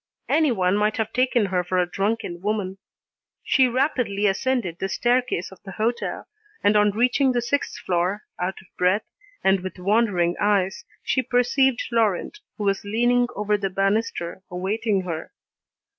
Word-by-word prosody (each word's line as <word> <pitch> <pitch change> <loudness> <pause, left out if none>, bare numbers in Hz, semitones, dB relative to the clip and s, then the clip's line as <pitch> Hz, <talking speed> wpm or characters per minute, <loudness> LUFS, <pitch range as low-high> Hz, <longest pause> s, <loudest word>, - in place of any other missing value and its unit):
Anyone 215 - +2
might 210 0 +1
have 220 -1 -2
taken 250 -3 +2
her 180 -2 0
for 185 +1 -2
a 180 - +3
drunken 195 -1 -2
woman. 195 -2 -2 0.6
She 260 -2 +4
rapidly 250 -5 0
ascended 200 -3 0
the 195 - -2
staircase 245 -5 0
of 190 - -15
the 190 - -9
hotel, 230 +3 -2 0.4
and 205 +1 +4
on 210 0 +5
reaching 250 +5 +2
the 245 - +1
sixth 285 +4 -1
floor, 185 +4 -1 0.2
out 180 +2 -2
of 190 - -26
breath, 185 +4 +2 0.4
and 190 0 +4
with 185 +1 -7
wandering 185 -3 +2
eyes, 200 -2 +1 0.2
she 260 - +1
perceived 250 +1 +2
Laurent, 225 - 0 0.2
who 210 - -4
was 195 -1 0
leaning 240 +4 +2
over 210 0 0
the 195 -1 -1
banister 195 -2 -1
awaiting 195 +3 -1
her. 165 -3 -5
205 Hz, 155 wpm, -24 LUFS, 190-240 Hz, 0.6 s, on